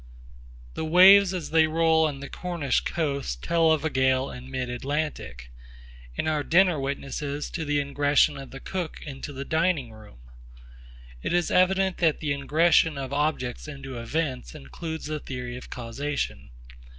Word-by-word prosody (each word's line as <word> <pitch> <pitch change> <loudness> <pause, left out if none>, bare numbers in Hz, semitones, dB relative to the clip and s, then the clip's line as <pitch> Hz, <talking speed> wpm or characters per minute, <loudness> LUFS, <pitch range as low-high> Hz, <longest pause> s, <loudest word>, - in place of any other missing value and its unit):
The - - -4
waves 185 +4 +7
as 180 -4 -5
they 160 0 +5
roll 160 0 +3
on 145 - -4
to - - -11
the 140 - -7
Cornish 170 -8 -1
coast 140 - -3
tell 165 -1 +3
of 155 -1 +1
a - - +2
gale 130 0 +1
in 125 +1 -10
mid 130 -1 -3
Atlantic; 125 - -4 0.7
and - - -1
our 155 -1 +1
dinner 175 0 +3
witnesses 140 +1 -4
to 165 - -3
the 145 0 0
ingression 145 +1 +2
of 135 - -10
the 135 - -9
cook 180 +1 -5
into 140 0 -7
the 140 0 -6
dining 160 -6 0
room. 110 - -15 1.0
It - - -2
is 175 -1 +1
evident 190 0 +3
that 165 -3 +2
the 150 - -2
ingression 155 +2 +3
of 135 0 -5
objects 145 -3 -1
into 135 -4 -7
events 130 - -3
includes 160 - -7
the 155 0 -3
theory 125 -3 -6
of 125 - -10
causation. 120 - -4
145 Hz, 165 wpm, -26 LUFS, 130-160 Hz, 1.0 s, waves